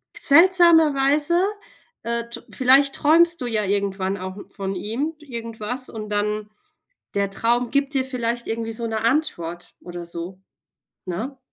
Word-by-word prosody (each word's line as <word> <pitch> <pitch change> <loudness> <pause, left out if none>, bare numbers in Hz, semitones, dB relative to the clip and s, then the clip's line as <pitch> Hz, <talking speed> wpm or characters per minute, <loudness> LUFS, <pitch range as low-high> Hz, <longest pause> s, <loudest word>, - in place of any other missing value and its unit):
seltsamerweise, 320 -2 +5 0.6
äh, 235 0 -3
t 235 0 -7
vielleicht 270 +2 +4
träumst 335 +2 +4
du 250 - -2
ja 220 -3 0
irgendwann 195 -1 -1
auch 185 +1 -7
von 195 -1 -5
ihm 245 - -3
irgendwas 235 -3 -5
und 215 -2 -7
dann 210 0 -1 0.7
der 200 -1 0
Traum 235 +4 +1
gibt 280 0 0
dir 265 -1 +1
vielleicht 240 -2 -2
irgendwie 225 0 -3
so 230 +1 -3
‘ne 220 -1 -2
Antwort 175 - -1
oder 175 -1 -8
so, 170 +2 -7 0.7
ne? 225 +10 -5
235 Hz, 135 wpm, -22 LUFS, 200-275 Hz, 0.7 s, seltsamerweise